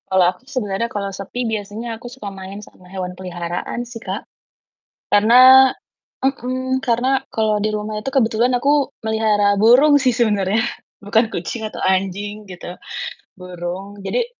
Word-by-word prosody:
Kalau 190 Hz, -1 st, +4 dB
aku 180 Hz, -, -20 dB
sebenarnya 235 Hz, -6 st, -2 dB
kalau 200 Hz, -2 st, -3 dB
sepi 200 Hz, +6 st, -4 dB
biasanya 220 Hz, +1 st, -4 dB
aku 245 Hz, -, -9 dB
suka 245 Hz, -6 st, -7 dB
main 190 Hz, +1 st, -8 dB
sama 180 Hz, -, -19 dB
hewan 185 Hz, -1 st, -5 dB
peliharaan 175 Hz, +5 st, -4 dB
sih 240 Hz, -1 st, -9 dB
Kak. 190 Hz, +2 st, -5 dB, 0.9 s
Karena 255 Hz, +5 st, +8 dB, 0.6 s
mmm, 260 Hz, 0 st, -1 dB
karena 255 Hz, +2 st, +1 dB
kalau 215 Hz, -1 st, +1 dB
di 215 Hz, -, +1 dB
rumah 210 Hz, 0 st, -3 dB
itu 270 Hz, -, -4 dB
kebetulan 240 Hz, -1 st, +2 dB
aku 285 Hz, +2 st, +2 dB
melihara 215 Hz, -2 st, +2 dB
burung 260 Hz, +7 st, +6 dB
sih 255 Hz, -2 st, +3 dB
sebenarnya 210 Hz, -3 st, +2 dB, 0.4 s
bukan 220 Hz, +3 st, +2 dB
kucing 185 Hz, +7 st, -4 dB
atau -, -, -9 dB
anjing 195 Hz, +3 st, -1 dB
gitu, 175 Hz, 0 st, -8 dB, 0.6 s
burung, 180 Hz, +3 st, -7 dB
jadi 470 Hz, -, -1 dB
215 Hz, 140 wpm, -20 LUFS, 195-245 Hz, 0.9 s, Karena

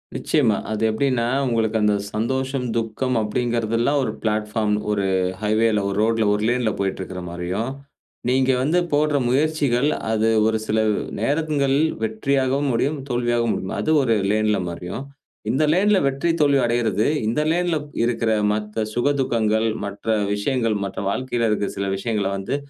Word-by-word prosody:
நிச்சயமா. 120 Hz, -9 st, +2 dB
அது 110 Hz, -, -2 dB
எப்படின்னா 120 Hz, +1 st, 0 dB, 0.2 s
உங்களுக்கு 115 Hz, -2 st, +1 dB
அந்த 105 Hz, -1 st, +3 dB, 0.2 s
சந்தோஷம், 130 Hz, +4 st, -1 dB
துக்கம் 115 Hz, +3 st, -1 dB
அப்படிங்கிறதுலாம் 115 Hz, +4 st, 0 dB
ஒரு -, -, -1 dB
பிளாட்பார்ம். 105 Hz, -1 st, 0 dB, 0.2 s
ஒரு 100 Hz, -2 st, 0 dB, 0.4 s
ஹைவே, 110 Hz, +2 st, +2 dB, 0.2 s
ஒரு 100 Hz, -, -2 dB
ரோட்டில, 115 Hz, 0 st, +2 dB
ஒரு 105 Hz, +1 st, -1 dB
லேன்ல 120 Hz, -2 st, +1 dB
போய்ட்டு 95 Hz, -1 st, -2 dB
இருக்கிற 95 Hz, -1 st, -6 dB
மாதிரியும், 90 Hz, +8 st, -3 dB, 0.6 s
நீங்க 130 Hz, +1 st, +3 dB
வந்து 155 Hz, +7 st, +2 dB
போடுற 150 Hz, 0 st, +2 dB
முயற்சிகள் 140 Hz, -1 st, +1 dB, 0.2 s
அது 110 Hz, 0 st, +2 dB, 0.2 s
ஒரு 110 Hz, 0 st, +2 dB
சில 110 Hz, -, 0 dB, 0.4 s
நேரங்கள்ல 140 Hz, +2 st, +1 dB, 0.2 s
வெற்றியாவும் 135 Hz, +5 st, 0 dB
முடியும், 140 Hz, +6 st, 0 dB
தோல்வியாவும் 120 Hz, -1 st, +1 dB
முடியும். 95 Hz, -, -4 dB
அது -, -, -2 dB
ஒரு 115 Hz, -4 st, +2 dB, 0.2 s
லேன்ல 105 Hz, -1 st, +1 dB
மாதிரியும், 90 Hz, +8 st, -6 dB, 0.5 s
இந்த 140 Hz, +4 st, +1 dB
லேன்ல 200 Hz, +3 st, +3 dB
வெற்றி, 135 Hz, +5 st, -1 dB
தோல்வி 140 Hz, -2 st, +4 dB
அடைவது 115 Hz, -3 st, +1 dB, 0.2 s
இந்த 115 Hz, +7 st, +1 dB
லேன்ல 175 Hz, 0 st, +1 dB, 0.3 s
இருக்கிற 115 Hz, -1 st, 0 dB, 0.2 s
மற்ற 105 Hz, +1 st, -3 dB
சுக 120 Hz, +5 st, +1 dB
துக்கங்கள், 110 Hz, -3 st, +1 dB, 0.2 s
மற்ற 100 Hz, +2 st, -8 dB, 0.3 s
விஷயங்கள் 115 Hz, +1 st, 0 dB
மற்ற 95 Hz, -, -6 dB
வாழ்க்கையில 120 Hz, +1 st, -1 dB
இருக்கற 105 Hz, -1 st, 0 dB
சில 100 Hz, 0 st, -1 dB
விஷயங்கள 105 Hz, -1 st, -1 dB
வந்து 95 Hz, +8 st, -3 dB
115 Hz, 145 wpm, -22 LUFS, 105-135 Hz, 0.6 s, தோல்வி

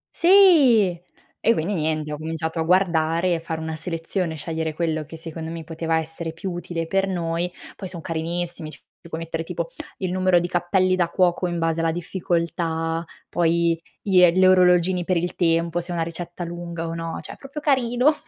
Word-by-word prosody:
Sì! 315 Hz, -, +6 dB, 0.5 s
E 230 Hz, -, +6 dB
quindi 185 Hz, 0 st, -1 dB
niente, 155 Hz, -3 st, -1 dB
ho -, -, -4 dB
cominciato 160 Hz, +1 st, -3 dB
a -, -, +2 dB
guardare, 170 Hz, -1 st, +2 dB
fare 160 Hz, -1 st, -5 dB
una 160 Hz, 0 st, -4 dB
selezione, 165 Hz, +1 st, -3 dB
scegliere 160 Hz, 0 st, -3 dB
quello 160 Hz, -2 st, -1 dB
che 160 Hz, +2 st, -10 dB
secondo 160 Hz, 0 st, -7 dB
me 165 Hz, 0 st, -6 dB
poteva 165 Hz, 0 st, -1 dB
essere 160 Hz, +1 st, -4 dB
più 185 Hz, +3 st, -5 dB
utile 175 Hz, -1 st, -4 dB
per 195 Hz, +3 st, +1 dB
noi. 170 Hz, -1 st, -1 dB, 0.2 s
Poi 190 Hz, -, -7 dB
son 180 Hz, -1 st, -7 dB
carinissimi, 170 Hz, 0 st, -3 dB
ci 140 Hz, -4 st, -11 dB, 0.3 s
puoi 160 Hz, -, -4 dB
mettere 165 Hz, 0 st, -3 dB
tipo 170 Hz, 0 st, -4 dB, 0.3 s
il 185 Hz, -2 st, -2 dB
numero 185 Hz, -1 st, +3 dB
di 175 Hz, -, -2 dB
cappelli 185 Hz, +1 st, +2 dB
da 175 Hz, -2 st, +1 dB
cuoco, 180 Hz, 0 st, +2 dB
in 175 Hz, -1 st, -2 dB
base 165 Hz, 0 st, 0 dB
alla 165 Hz, 0 st, +2 dB
difficoltà, 165 Hz, -1 st, -2 dB, 0.2 s
poi 170 Hz, -1 st, +1 dB, 0.2 s
glie 180 Hz, -3 st, +6 dB
gli 185 Hz, +1 st, +4 dB
orologini 180 Hz, -1 st, +4 dB
per 180 Hz, +1 st, +1 dB
il 175 Hz, +1 st, -1 dB
tempo, 165 Hz, 0 st, +1 dB
se 175 Hz, +1 st, -6 dB
è 175 Hz, -, -2 dB
una 165 Hz, -, 0 dB
ricetta 170 Hz, +1 st, -6 dB
lunga 170 Hz, -1 st, -5 dB
o 165 Hz, -, -4 dB
no, 165 Hz, 0 st, -4 dB
cioè -, -, -9 dB
è -, -, -12 dB
proprio 275 Hz, +2 st, -8 dB
carino. 260 Hz, 0 st, +3 dB
170 Hz, 185 wpm, -23 LUFS, 165-180 Hz, 0.5 s, Sì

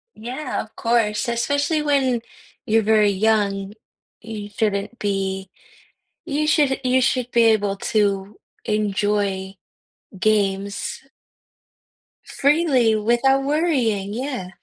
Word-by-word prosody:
Yeah, 255 Hz, +5 st, -4 dB
of 215 Hz, -, -13 dB
course, 230 Hz, -1 st, 0 dB
especially 285 Hz, +6 st, 0 dB
when 265 Hz, -5 st, +1 dB, 0.4 s
you're 225 Hz, -1 st, +3 dB
very 215 Hz, -1 st, +4 dB
young, 200 Hz, -1 st, 0 dB, 0.5 s
you 210 Hz, -2 st, -7 dB
shouldn't 205 Hz, +2 st, -2 dB
be 195 Hz, -2 st, -2 dB, 0.8 s
you 305 Hz, -1 st, -1 dB
should 295 Hz, -3 st, +2 dB
you 255 Hz, +1 st, +3 dB
should 250 Hz, -1 st, 0 dB
be 235 Hz, -1 st, +4 dB
able 205 Hz, -3 st, +2 dB
to 200 Hz, -1 st, -1 dB, 0.3 s
enjoy 205 Hz, -2 st, -1 dB, 0.6 s
games 200 Hz, -1 st, 0 dB, 1.2 s
freely 275 Hz, -6 st, +2 dB
without 240 Hz, +5 st, +2 dB
worrying, 260 Hz, -, 0 dB
yeah. 250 Hz, -7 st, -4 dB
220 Hz, 100 wpm, -21 LUFS, 200-260 Hz, 1.2 s, very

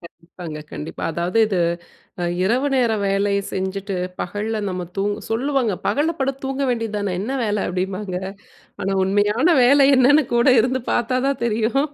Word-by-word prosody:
கண்டிப்பாங்க, 165 Hz, -2 st, -9 dB
கண்டிப்பா. 150 Hz, -, -6 dB
அதாவது 175 Hz, +6 st, -2 dB
இது 195 Hz, -4 st, -1 dB, 0.9 s
இரவு 250 Hz, +8 st, +1 dB
நேரம் 225 Hz, -5 st, +1 dB
வேலை 200 Hz, +1 st, +1 dB, 0.2 s
செஞ்சுட்டு 190 Hz, +1 st, -3 dB, 0.3 s
பகல்ல 210 Hz, +4 st, -3 dB
நம்ம 180 Hz, -1 st, -4 dB
தூங்க 205 Hz, +2 st, -1 dB
சொல்லுவாங்க 250 Hz, -2 st, 0 dB
"பகல்ல 315 Hz, +4 st, +1 dB
படுத்து 270 Hz, 0 st, -2 dB
தூங்க 270 Hz, +1 st, -2 dB
வேண்டியது 225 Hz, -3 st, -2 dB
தான, 200 Hz, -3 st, -2 dB
என்ன 240 Hz, +6 st, -3 dB
வேல" 210 Hz, -2 st, 0 dB
அப்டிம்பாங்க 185 Hz, +1 st, -3 dB, 0.7 s
ஆனா, 195 Hz, -, -1 dB
உண்மையான 205 Hz, -, +2 dB, 0.2 s
வேல 275 Hz, +2 st, +6 dB
என்னன்னு 280 Hz, +4 st, +5 dB
கூட 235 Hz, +3 st, +3 dB
இருந்து 255 Hz, +1 st, -1 dB
பாத்தா 245 Hz, +2 st, +1 dB
தான் 275 Hz, -3 st, -1 dB
தெரியும். 230 Hz, +4 st, +1 dB
215 Hz, 145 wpm, -21 LUFS, 195-255 Hz, 0.9 s, வேல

